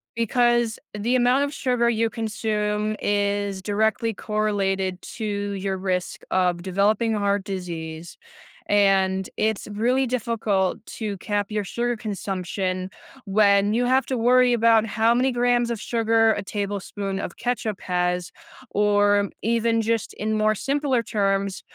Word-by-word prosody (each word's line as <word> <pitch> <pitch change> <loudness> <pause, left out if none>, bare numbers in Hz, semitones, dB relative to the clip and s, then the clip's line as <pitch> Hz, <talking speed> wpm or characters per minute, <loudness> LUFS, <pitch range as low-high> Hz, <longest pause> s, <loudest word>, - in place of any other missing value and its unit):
Because 240 0 +2 0.2
the 235 +5 0
amount 250 +3 +3
of 285 +1 -3
sugar 245 -3 +1
you 225 0 +1
consume 215 -1 -2
is 200 -1 0
directly 220 +3 0
correlated 195 -3 -1 0.2
to 220 - -3 0.3
your 195 -1 -2
risk 185 -1 -2
of 180 -2 +1
developing 210 +4 +1
heart 200 -1 0
disease, 170 -4 -6 0.5
and 190 -2 +2
it's 220 -1 -1
really 250 +5 +1
difficult 220 -5 -1
to 210 -3 -5
cap 205 +1 -2
your 210 -1 -1
sugar 240 +4 -2
consumption 190 -3 -3 0.4
when 200 0 +3
you 245 +1 +2
have 260 +2 +2
to 260 - -1
worry 250 +1 +4
about 225 -1 +4
how 225 +2 +2
many 255 +2 +2
grams 240 0 +2
of 230 -3 -3
sugar 225 0 +2
a 205 - -3
tablespoon 200 -1 -4
of 175 - -6
ketchup 235 -4 -2
has, 180 -1 -1 0.4
or 205 -1 +3
even 230 0 +1
just 225 -1 -1
in 215 +1 -2
more 215 0 +2
simpler 270 -1 0
terms, 195 -2 -1
210 Hz, 135 wpm, -24 LUFS, 195-230 Hz, 0.5 s, worry